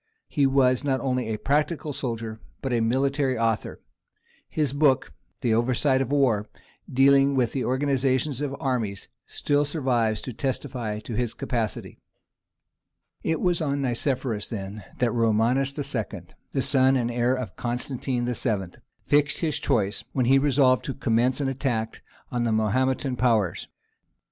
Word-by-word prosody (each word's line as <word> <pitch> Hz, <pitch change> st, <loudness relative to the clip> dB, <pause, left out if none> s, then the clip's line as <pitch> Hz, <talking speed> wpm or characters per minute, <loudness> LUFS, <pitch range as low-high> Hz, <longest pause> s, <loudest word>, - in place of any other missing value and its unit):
He 145 Hz, -4 st, +2 dB
was 130 Hz, -1 st, +3 dB
not 135 Hz, -2 st, +1 dB
only 125 Hz, -2 st, -1 dB
a 110 Hz, -1 st, -2 dB
practical 150 Hz, +3 st, 0 dB
soldier, 115 Hz, -4 st, -4 dB, 0.2 s
but 135 Hz, -2 st, -1 dB
a 120 Hz, -, +2 dB
military 135 Hz, +3 st, +1 dB
author: 115 Hz, -1 st, -1 dB, 0.7 s
his 150 Hz, -4 st, 0 dB
book, 140 Hz, -3 st, +2 dB, 0.3 s
Περὶ 115 Hz, -1 st, +3 dB
Παραδρόμης 130 Hz, +1 st, +1 dB
πολέμου, 130 Hz, -8 st, +2 dB, 0.5 s
dealing 140 Hz, +1 st, +5 dB
with 125 Hz, -3 st, +2 dB
the 130 Hz, -, -2 dB
organization 135 Hz, +1 st, +1 dB
of 140 Hz, -1 st, -2 dB
armies, 115 Hz, -7 st, -2 dB, 0.2 s
still 145 Hz, 0 st, +1 dB
survives 125 Hz, -8 st, 0 dB
to 125 Hz, -, -6 dB
testify 125 Hz, -4 st, -3 dB
to 115 Hz, -, -7 dB
his 120 Hz, 0 st, -1 dB
capacity. 115 Hz, -4 st, -3 dB, 1.2 s
It 160 Hz, -1 st, -1 dB
was 175 Hz, -2 st, +1 dB
on 140 Hz, -2 st, -1 dB
Nicephorus 125 Hz, -3 st, -1 dB
then 100 Hz, -2 st, -6 dB
that 120 Hz, -2 st, +1 dB
Romanus 115 Hz, +4 st, +2 dB
II., 120 Hz, -, -3 dB, 0.3 s
the 135 Hz, -, 0 dB
son 135 Hz, -1 st, +3 dB
and 120 Hz, -1 st, -1 dB
heir 120 Hz, +2 st, +1 dB
of 120 Hz, -8 st, -5 dB
Constantine 125 Hz, +1 st, -2 dB
VII., 110 Hz, -7 st, -2 dB, 0.3 s
fixed 145 Hz, 0 st, +2 dB
his 155 Hz, -3 st, 0 dB
choice, 100 Hz, -2 st, 0 dB
when 130 Hz, -3 st, +1 dB
he 135 Hz, +2 st, +5 dB
resolved 135 Hz, -2 st, +3 dB
to 135 Hz, -, -4 dB
commence 125 Hz, +1 st, +1 dB
an 140 Hz, -, 0 dB
attack 125 Hz, -4 st, -2 dB, 0.3 s
on 120 Hz, -2 st, 0 dB
the 115 Hz, -, +1 dB
Mahometan 130 Hz, +4 st, +1 dB
powers. 115 Hz, -7 st, +1 dB
130 Hz, 145 wpm, -25 LUFS, 115-135 Hz, 1.2 s, dealing